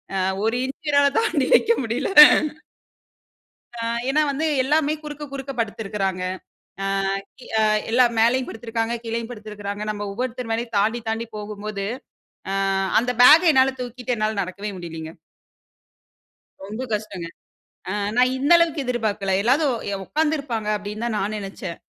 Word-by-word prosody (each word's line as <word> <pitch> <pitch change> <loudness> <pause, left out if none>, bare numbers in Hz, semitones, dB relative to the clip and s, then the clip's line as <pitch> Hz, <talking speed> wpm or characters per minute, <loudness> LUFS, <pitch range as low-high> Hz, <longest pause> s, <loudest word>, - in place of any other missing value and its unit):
ஆ. - - 0 0.3
1'' 260 +7 -2
என்னால 285 -1 +5
தாண்டி 340 -12 +1
வைக்க - - +3
முடில. 235 +4 -2 1.7
அ, - - -7 0.3
ஏன்னா, 300 +3 +3
வந்து 290 +3 -2 0.2
எல்லாமே 300 +2 +2
குறுக்க, 295 0 -7
குறுக்க 275 0 -5
படுத்துருக்காங்க. 200 -4 -2 0.6
அ, - - -1 0.7
அ - - +4 0.3
எல்லாம் 240 0 +4
மேலயும் 250 +3 +3
படுத்துருக்காங்க, 225 0 -3
கீழயும் 230 0 -3
படுத்துருக்காங்க. 210 -2 -6
நம்ப 205 -1 -5
ஒவ்வொருத்தர் 250 +1 -4
மேலயும் 230 0 -3
தாண்டி, 225 +4 +1
தாண்டி 225 +1 -2
போகும்போது, 210 -1 -5 0.7
அ - - -1 0.5
அந்த 245 +2 -2
பேக்க 320 +7 +8
என்னா 260 -2 +6 0.2
தூக்கிட்டு 245 0 -4
என்னால 215 -1 -1
நடக்கவே 200 +3 -5
முடியலீங்க. 165 -2 -7 1.6
ரொம்ப 215 +5 -5
கஷ்டங்க. 200 -5 -4 0.6
அ - - -2 0.2
நான் 255 +1 +3
இந்த 280 +5 0
அளவுக்கு 330 -4 +1
எதிர்பார்க்கல. 215 -5 -1
எல்லாரும் 265 +3 +2 0.2
எ - - -2
உட்கார்ந்துருப்பாங்க 290 -8 -1
அப்டீன்னு 210 +2 -6
தான் 235 -2 -1
நான் 210 +2 -2
நினைச்சேன். 195 -3 -7
230 Hz, 130 wpm, -22 LUFS, 210-260 Hz, 1.7 s, பேக்க